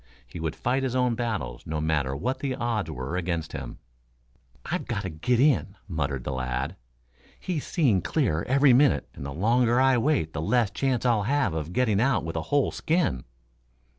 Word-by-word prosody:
He 60 Hz, +8 st, -9 dB
would 80 Hz, -1 st, -3 dB
fight 130 Hz, +3 st, 0 dB
his 130 Hz, -2 st, -2 dB
own 125 Hz, -2 st, +2 dB
battles, 115 Hz, -1 st, -3 dB
no 80 Hz, 0 st, -2 dB
matter 75 Hz, -4 st, 0 dB
what 130 Hz, -, -2 dB
the 135 Hz, -1 st, -2 dB
odds 115 Hz, -8 st, -2 dB
were 65 Hz, +2 st, -4 dB
against 85 Hz, -3 st, -2 dB
him. 65 Hz, -3 st, -6 dB, 0.9 s
"I've -, -, -3 dB
got 100 Hz, -, -2 dB
to 95 Hz, -, -4 dB
get 115 Hz, +10 st, 0 dB
in," 130 Hz, -8 st, +3 dB
muttered 70 Hz, -7 st, -2 dB
the -, -, -3 dB
lad. 65 Hz, -1 st, -3 dB, 0.6 s
"He's 170 Hz, -6 st, -3 dB
seeing 125 Hz, -, +2 dB
clearer 100 Hz, -, 0 dB
every 135 Hz, +1 st, +5 dB
minute, 135 Hz, +1 st, +4 dB
and -, -, -9 dB
the 70 Hz, -, -5 dB
longer 120 Hz, -, +2 dB
I 130 Hz, -1 st, +4 dB
wait 115 Hz, -, +1 dB
the 80 Hz, -, -3 dB
less 110 Hz, +4 st, +2 dB
chance 130 Hz, -2 st, -1 dB
I'll 120 Hz, -4 st, +3 dB
have 140 Hz, -, +1 dB
of 80 Hz, +1 st, -4 dB
getting 110 Hz, -1 st, +2 dB
out 130 Hz, -7 st, +2 dB
with 80 Hz, -, -5 dB
a 80 Hz, -, -1 dB
whole 145 Hz, -2 st, +2 dB
skin. 155 Hz, -, 0 dB
110 Hz, 190 wpm, -26 LUFS, 80-130 Hz, 0.9 s, every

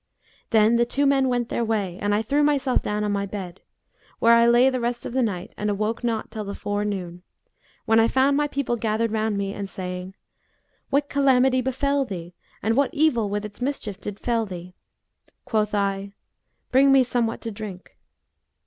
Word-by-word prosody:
Then 220 Hz, +1 st, +4 dB
the 240 Hz, -, +3 dB
two 285 Hz, +3 st, 0 dB
men 275 Hz, -1 st, +3 dB
went 245 Hz, -1 st, -1 dB
their 235 Hz, -, -1 dB
way 205 Hz, -5 st, -2 dB
and 205 Hz, 0 st, +1 dB
I 215 Hz, -, 0 dB
threw 285 Hz, +6 st, +1 dB
myself 280 Hz, -3 st, +2 dB
down 210 Hz, 0 st, -2 dB
on 210 Hz, -, 0 dB
my 200 Hz, 0 st, -1 dB
bed, 190 Hz, -3 st, -7 dB, 0.6 s
where 230 Hz, 0 st, +5 dB
I 235 Hz, 0 st, +6 dB
lay 240 Hz, +2 st, +5 dB
the 260 Hz, -1 st, +1 dB
rest 240 Hz, 0 st, -2 dB
of -, -, -5 dB
the 260 Hz, -, +1 dB
night 205 Hz, -3 st, -3 dB
and 210 Hz, -, -1 dB
awoke 215 Hz, +3 st, -2 dB
not 225 Hz, -3 st, -2 dB
till 220 Hz, -1 st, -5 dB
the 200 Hz, 0 st, -6 dB
forenoon, 200 Hz, -4 st, -3 dB, 0.6 s
when 225 Hz, 0 st, +4 dB
I 225 Hz, -, +5 dB
found 265 Hz, +3 st, +3 dB
my 295 Hz, +1 st, +2 dB
people 280 Hz, -4 st, -2 dB
gathered 225 Hz, 0 st, 0 dB
round 220 Hz, -1 st, 0 dB
me 200 Hz, 0 st, -2 dB
and 200 Hz, -1 st, -5 dB
saying, 180 Hz, 0 st, -6 dB, 0.7 s
'What 285 Hz, +1 st, +1 dB
calamity 265 Hz, -2 st, +3 dB
befel 275 Hz, +2 st, 0 dB
thee, 180 Hz, -7 st, -7 dB, 0.3 s
and 225 Hz, +1 st, +1 dB
what 280 Hz, +2 st, +2 dB
evil 260 Hz, -9 st, +2 dB
with 205 Hz, +1 st, -2 dB
its 210 Hz, +3 st, -10 dB
mischief 235 Hz, -7 st, -3 dB
did 205 Hz, -1 st, -6 dB
fell 230 Hz, -2 st, 0 dB
thee?' 180 Hz, -1 st, -8 dB, 0.7 s
Quoth 215 Hz, -2 st, 0 dB
I 200 Hz, 0 st, -1 dB, 0.6 s
'Bring 270 Hz, +2 st, +5 dB
me 270 Hz, -1 st, +6 dB
somewhat 240 Hz, -2 st, -1 dB
to 230 Hz, -, -4 dB
drink.' 200 Hz, -3 st, -9 dB
225 Hz, 190 wpm, -24 LUFS, 205-255 Hz, 0.7 s, I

